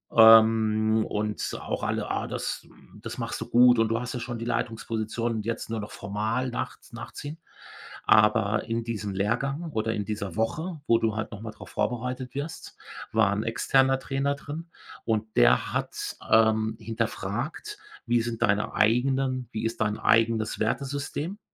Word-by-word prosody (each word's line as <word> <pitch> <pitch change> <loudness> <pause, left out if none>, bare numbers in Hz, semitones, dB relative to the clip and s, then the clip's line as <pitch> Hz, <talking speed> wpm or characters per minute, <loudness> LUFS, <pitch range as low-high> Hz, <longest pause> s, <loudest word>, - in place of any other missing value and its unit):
Ähm, 110 -1 +6
und 105 0 -2
auch - - -4
alle: - - -1
„Ah, - - -2
das - - -4 0.4
das - - -6
machst - - -4
du - - -5
gut 120 -1 +6
und 115 -1 +3
du 115 +1 +1
hast 125 - -5
ja 125 - -3
schon 120 0 -5
die 115 - -4
Leitungsposition 115 0 -2
und 110 -1 -4
jetzt 115 -1 -3
nur 115 -1 -2
noch 105 - -7
formal 110 +6 -2
nach - - -4
nachziehen“, 145 +6 -7 0.7
aber 105 -1 +4
in 115 0 -2
diesem 105 -3 -4
Lehrgang 135 - -1
oder 110 -1 -1
in 105 -2 -2
dieser 100 -4 -4
Woche, 155 +9 -2
wo 115 -1 +5
du 110 -2 0
halt 110 - -3
noch 105 0 -8
mal 110 -1 -6
drauf 110 - -13
vorbereitet 125 +1 -2
wirst, 155 +3 -6 0.4
war 105 -3 +4
’n 105 +2 -1
externer 135 +3 +2
Trainer 135 +1 -1
drin 155 +4 -8 0.4
und 110 -1 -1
der - - +4
hat, - - -3 0.2
ähm, 110 0 +4
hinterfragt, 115 - -4 0.3
wie 120 0 +2
sind 115 -1 -2
deine 105 +1 +1
eigenen 130 +2 +2
wie 110 +1 -3
ist 115 0 -3
dein 105 -1 +1
eigenes 115 -1 +2
Wertesystem 140 - -2
115 Hz, 165 wpm, -27 LUFS, 110-125 Hz, 0.7 s, Ähm